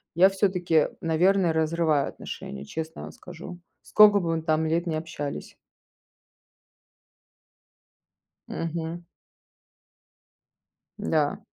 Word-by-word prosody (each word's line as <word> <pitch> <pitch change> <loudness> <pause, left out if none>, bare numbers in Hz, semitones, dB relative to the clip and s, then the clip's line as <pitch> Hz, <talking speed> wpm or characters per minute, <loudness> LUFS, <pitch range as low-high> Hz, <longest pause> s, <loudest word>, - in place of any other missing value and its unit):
я 180 +3 +7
всё-таки, 180 -5 +1
наверное, 175 +2 +2
разрываю 160 -2 +1
отношения, 70 +1 -8
честно 160 - -6
вам - - -8
скажу. 175 0 -10 0.2
Скока 210 -1 +6
бы 165 -3 -1
мы 160 - -2
там 160 0 +1
лет 170 +2 0
не 165 - -2
общались. 155 -3 -6 2.9
Мгм. 165 +1 -4 1.9
Да. 150 -2 0
165 Hz, 90 wpm, -26 LUFS, 160-175 Hz, 2.9 s, я